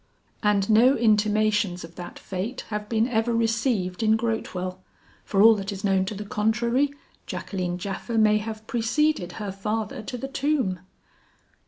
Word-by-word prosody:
"And 205 -2 +2
no 235 +5 +5
intimations 210 -3 +2
of 165 0 -10
that 175 0 -8
fate 200 +7 -4
have 210 -1 -4
been 225 0 +2
ever 230 -1 0
received 225 -5 0
in 220 0 +4
Grotewell. 185 -5 -3 0.5
For 200 0 +3
all 225 +1 +9
that 195 0 -4
is 195 -1 -7
known 190 -2 +2
to 205 - -4
the 205 +1 -6
contrary, 235 +6 +1 0.4
Jacqueline 180 -3 -3
Japha 200 +5 -4
may 215 -1 +5
have 215 0 -6
preceded 240 - 0
her 205 -3 -5
father 210 +3 -3
to 245 +4 -6
the 270 - -5
tomb." 270 - 0
215 Hz, 155 wpm, -25 LUFS, 195-230 Hz, 0.5 s, all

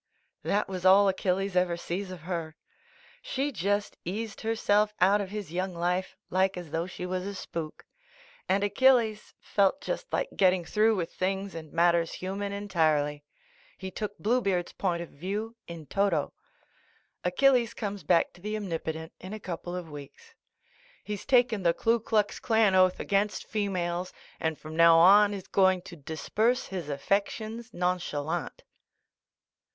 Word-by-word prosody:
'T'HAT 205 +1 0
was 185 -2 -5
all 195 +2 +7
Achilles 190 0 0
ever 180 -1 +2
sees 185 +3 -4
of 185 -3 -8
her. 165 -2 -4
•*■ - - -30
She 275 +2 -2
just 205 -1 -1
eased 210 +4 -5
herself 210 -2 +1
out 200 +3 +4
of 195 - -5
his 205 -5 -6
young 185 0 -2
life 180 +2 -1 0.2
like 190 +1 +2
as 175 -4 -8
though 165 +2 -1
she 185 -1 -6
was 185 0 -2
a 200 - -5
spook 165 -4 -6 0.3
— - - -26
and 195 +1 +2
Achilles 220 0 +2
felt 200 +7 +1
just - - -5
like - - 0
getting 185 -2 +3
through 220 +4 +3
with 175 -3 -3
things 195 +1 -2
and 160 -2 -8
matters 170 0 +2
human, 200 +2 -4
entirely. 155 -7 0 0.5
He 190 -1 -6
took 205 +1 -5
Bluebeard's 200 -6 0
point 175 -3 -1
of 170 - -11
view 205 +9 -4
in 170 -2 -8
toto. 185 -3 0 0.9
Achilles 240 +5 +3
comes 205 -2 -4
back 170 +2 +2
to 175 - -18
the 210 +2 -3
Omnipotent 160 -4 -4
in 185 +3 -8
a 215 - -5
couple 175 -2 -5
of 180 -2 -5
weeks. 150 - -11 0.7
He's 210 -1 -5
taken 245 -5 +3
the 170 -2 +2
Klu 230 +1 +2
Klux 210 -2 0
Klan 220 -4 +3
oath 185 -1 +4
against 200 +1 0
females, 180 -4 -2 0.3
and 160 -1 -1
from 155 0 -9
now 165 0 +7
on, 200 +5 +7
is 195 -3 -6
going 190 -2 +3
to - - -10
disburse 215 - -1
his 180 -6 -5
affections 215 - -2
nonchalant. 175 -4 -2
190 Hz, 155 wpm, -28 LUFS, 175-210 Hz, 0.9 s, all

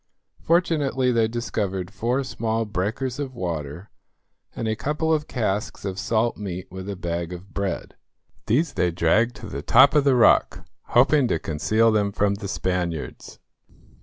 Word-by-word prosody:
Fortunately 150 -7 +1
they 115 -2 +2
discovered 100 -5 -3
four 120 +6 -1
small 115 -3 -2
breakers 110 +7 -3
of 135 -3 -4
water, 85 -2 -5 0.6
and 115 - -3
a 110 - 0
couple 150 +7 -1
of 150 -1 -1
casks 110 -2 -2
of 95 -1 -3
salt 115 +3 0
meat 95 -3 -5
with 95 +2 -7
a 100 - -3
bag 85 -1 -3
of 90 +2 -10
bread. 100 -3 -3 0.5
These 145 +8 +1
they 90 - +1
dragged 90 +8 +2
to - - -10
the 70 - -5
top 130 - +6
of 150 -2 +4
the 140 -2 +4
rock, 120 - +4 0.2
hoping 130 +2 +4
to 85 - +1
conceal 110 +10 +1
them 105 -2 +1
from 100 0 +1
the 100 0 -6
Spaniards. 90 -4 -3
110 Hz, 160 wpm, -24 LUFS, 95-125 Hz, 0.6 s, top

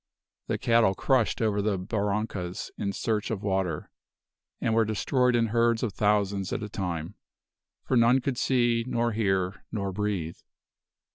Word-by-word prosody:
The - - 0
cattle 115 -5 +3
crushed 125 -2 +1
over 105 -2 +1
the 100 -1 0
barrancas 100 -2 -3
in 100 - -2
search 105 +1 -1
of 105 -3 -3
water, 95 -6 -1 0.7
and 115 - 0
were 115 0 +4
destroyed 125 +4 +1
in 115 -1 +2
herds 115 +1 +2
of 110 -5 -1
thousands 100 -2 +1
at - - -2
a 105 - -5
time; 90 -3 -4 0.7
for 130 - 0
none 120 +2 +5
could 130 -1 -2
see, 120 -3 +2
nor 120 -1 0
hear, 95 -3 0
nor 100 -3 -2
breathe. 95 -5 -3
105 Hz, 150 wpm, -27 LUFS, 95-115 Hz, 0.7 s, none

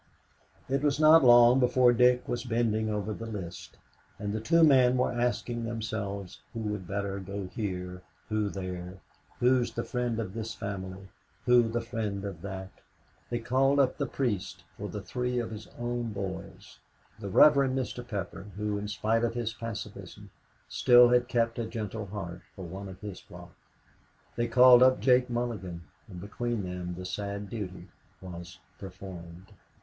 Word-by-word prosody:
It 135 +1 0
was 145 -1 +1
not 155 0 +7
long 120 +1 +7
before 125 -1 +4
Dick 125 +1 +3
was 120 -1 -2
bending 115 -3 0
over 105 0 -2
the 115 +2 -7
list; 95 -6 -7 0.4
and 105 0 -4
the 110 - -1
two 165 +9 +4
men 130 -4 +5
were 125 - +1
asking 120 -1 -1
themselves 110 -4 -4
who 115 - -3
would 105 -4 -4
better 100 0 -3
go 100 +1 -5
here, 90 -4 -4 0.3
who 110 -1 0
there, 90 -2 -6 0.4
who's 125 0 +2
the - - -2
friend 125 -2 -2
of 100 -5 -4
this 115 0 -5
family, 95 -1 -6 0.4
who 120 -2 +5
the 120 +1 -1
friend 105 -4 -4
of 95 -5 -6
that? 95 0 -6 0.6
They 120 - -1
called 135 +4 +2
up 130 -2 +2
the 140 - 0
priest 100 -7 -2
for 105 +1 -6
the 105 -2 -6
three 125 0 -2
of 120 -2 -2
his 110 0 -8
own 120 -1 -3
boys; 100 -2 -7 0.4
the 100 -2 -5
Rev. 150 +10 +7 0.2
Mr. 130 -1 -3
Pepper, 100 -4 -6
who, 105 0 -2
in 105 - -5
spite 110 +2 0
of 115 0 0
his 115 -2 -2
pacifism, 115 -1 -8 0.4
still 120 0 +6
had 125 0 +3
kept 115 -1 0
a 115 - -2
gentle 110 -1 -5
heart, 95 -3 -6
for 95 - -7
one 95 +3 -7
of 95 - -11
his 105 -3 -7
flock. 90 0 -13 0.8
They 120 0 0
called 125 +1 +7
up 130 0 +6
Jake 125 -1 +3
Mulligan, 105 -8 -3 0.2
and 90 -4 -9
between 110 +3 -3
them 90 -1 -5
the 90 +1 -7
sad 100 +2 -5
duty 100 -5 -6 0.3
was 90 0 -9 0.2
performed. 95 -1 -10
110 Hz, 165 wpm, -29 LUFS, 95-120 Hz, 0.8 s, not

